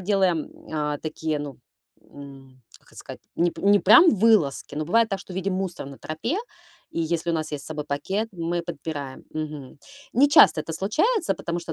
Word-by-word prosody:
делаем, 185 -4 +1
м, - - -18
а, 150 -2 -1
такие, 155 -1 -3
ну, 145 -3 -7 0.5
м, 135 -2 -13 0.2
как - - -29
это - - -18
сказать, - - -10 0.2
не 175 +1 +2
п - - -11
не 205 +1 +5
прям 230 - +7
вылазки, 195 -11 +2
но 155 - -2
бывает 225 +7 +3
так, 195 - -2
что 190 - -11
видим 190 +1 -2
мусор 185 -6 -4
на 140 -1 -10
тропе, 160 - -3 0.5
и - - -5
если 170 +1 -1
у - - 0
нас 155 -1 -3
есть 145 -2 -4
с - - -11
собой 150 -1 -5
пакет, 190 +10 -2
мы 170 -1 -2
подбираем, 145 -5 -6
мгм. 150 -3 -6 0.3
Нечасто 265 - +6
это 165 - -6
случается, 305 - +1
потому 170 +1 -4
что 165 - -6
165 Hz, 195 wpm, -24 LUFS, 150-195 Hz, 0.5 s, прям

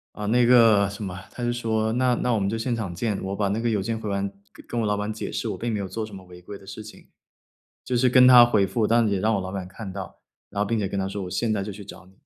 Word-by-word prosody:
啊， 105 - -5
那 120 +3 +3
个， 115 -5 +5
什 100 +2 -8
么， 90 -3 -5
他 125 - -8
就 120 - 0
说： 110 -2 -1
“那 125 0 +2
那 125 - 0
我 - - +1
们 100 -1 0
就 115 +3 -2
现 120 +1 -1
场 100 -6 -4
见。 105 +3 -2
“我 95 +1 -3
把 100 -1 0
那 105 +3 -1
个 120 0 0
邮 105 -3 0
件 110 +4 -2
回 110 -2 -5
完 100 0 -1 0.2
跟 - - -16
跟 120 - -2
我 110 - 0
老 105 - +1
板 105 +1 -3
解 110 - -6
释， - - -3
我 - - -3
并 120 0 -2
没 105 - -1
有 100 -1 -4
做 110 +3 -4
什 110 -2 -10
么 95 - -9
违 90 0 -13
规 100 +3 -9
的 95 - -17
事 105 +2 -8
情。 110 - -14 0.8
就 125 - -1
是 125 +1 +3
跟 125 +1 +6
他 125 -1 +10
回 110 -4 +2
复， 110 +2 0
但 115 +1 +3
是 105 - 0
也 - - 0
让 110 +3 +2
我 100 - 0
老 95 0 -5
板 95 -2 -4
看 95 +1 -8
到， 95 -3 -8 0.3
然 100 0 -1
后 - - -1
并 115 - 0
且 100 - -1
跟 100 - -3
他 95 - -2
说：” 100 0 -5
我 90 - -7
现 115 +4 -1
在 105 -2 -1
就 105 - -6
去 100 +1 -10
找 95 - -12
你。“ 95 - -20
105 Hz, 350 characters per minute, -24 LUFS, 100-115 Hz, 0.8 s, 他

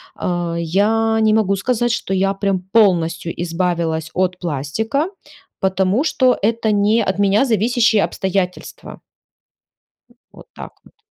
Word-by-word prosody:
а, 175 -1 -3
я 220 +6 +1
не 215 0 +3
могу 200 -3 +2
сказать, 240 +3 0
что 210 -4 -2
я 195 +1 +1
прям 195 -1 -1
полностью 170 -6 +2
избавилась 165 -2 -2
от 180 0 0
пластика, 180 - -2 0.5
потому 190 +6 +1
что 255 -5 +2
это 220 +1 0
не 210 +3 +2
от 190 - -2
меня 200 +5 +3
зависящие 225 -1 +2
обстоятельства. 190 -1 -4 1.1
М, 240 - -25 0.2
вот - - -16
так - - -9
вот. - - -22
195 Hz, 130 wpm, -18 LUFS, 180-225 Hz, 1.1 s, не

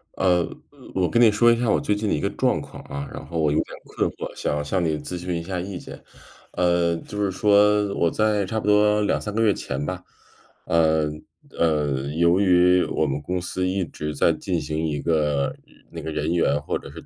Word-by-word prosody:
呃， 90 -2 +2 0.5
我 90 -2 +1
跟 120 - +2
你 115 - +8
说 120 +3 +5
一 115 - +2
下 120 - 0
我 - - +3
最 105 - 0
近 105 0 -2
的 - - +2
一 - - -2
个 - - -1
状 - - +1
况 - - -11
啊， 70 0 -6
然 - - -7
后 85 -1 -4
我 75 -2 +2
有 75 - +1
点 - - -4
困 - - -2
惑， - - -7
想 75 0 -2
向 90 +5 -1
你 80 -2 0
咨 90 +4 -6
询 90 0 -3
一 - - -6
下 90 +1 -4
意 95 +1 -5
见。 - - -10 0.5
呃， 85 -1 +2
就 105 +5 -5
是 100 - +1
说 105 0 +3
我 85 - +2
在 105 +1 +1
差 110 +4 -2
不 - - -6
多 105 0 +4
2-3 105 0 -1
个 115 - +1
月 105 -2 +4
前 70 -5 -4
吧， 90 +3 -5 0.6
呃， 80 -2 +2 0.5
呃， 75 -4 +1
由 85 +2 +3
于 90 -2 +4
我 80 - 0
们 70 0 -2
公 90 +4 -2
司 90 +1 -2
一 95 0 -1
直 75 0 -6
在 80 +3 +3
进 85 +2 -2
行 80 +1 -2
一 75 -1 -2
个 75 -4 0 0.4
那 - - -7
个 80 - -5
人 75 +2 -1
员 85 -4 +2
或 - - -2
者 - - -11
是 - - -11
90 Hz, 235 characters per minute, -23 LUFS, 80-100 Hz, 0.6 s, 你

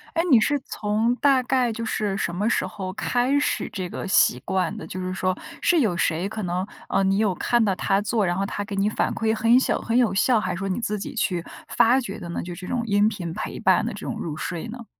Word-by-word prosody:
哎， 330 - +2
你 240 - +8
是 290 +6 +2
从 215 +1 0
大 270 -2 +3
概 250 -2 +1
就 230 - -5
是 210 -3 -1
什 175 -3 -2
么 205 +6 0
时 - - +1
候 185 -2 -6
开 245 +6 +1
始 285 - 0
这 185 -3 -4
个 - - -5
习 125 -9 +3
惯 190 +1 0
的？ - - -8
就 - - -7
是 185 0 -3
说， 185 -1 -1 0.2
是 345 -3 +3
有 210 -8 +1
谁 170 +3 0
可 215 0 -5
能， 180 +1 -1 0.2
呃， 195 - +1
你 195 0 +2
有 205 -4 +1
看 240 -1 +2
到 195 -2 +1
他 195 +1 +1
做， 210 0 0
然 175 - +1
后 195 - 0
他 205 +1 -3
给 200 -1 -6
你 200 +2 +2
反 - - -1
馈， 225 0 0
很 225 +1 +1
有 255 - +8
小 - - 0
很 230 +1 0
有 245 -5 +3
效， 225 +4 +3
还 185 -3 -2
是 - - -6
说 195 0 -3
你 185 - -1
自 210 -3 -2
己 200 - -6
去 180 -6 0 0.2
发 245 +3 +4
掘 210 -6 -5
的 175 -4 -8
呢， 170 - -3
就 175 0 -6
是 180 +1 -9
这 - - -6
种 250 - 0
音 205 0 +3
频 175 -7 -5
陪 - - -5
伴 - - +3
的 - - -2
这 - - -8
种 - - -3
入 155 -2 -5
睡 175 +7 -4
呢？ 235 0 -8
205 Hz, 290 characters per minute, -24 LUFS, 185-230 Hz, 0.2 s, 你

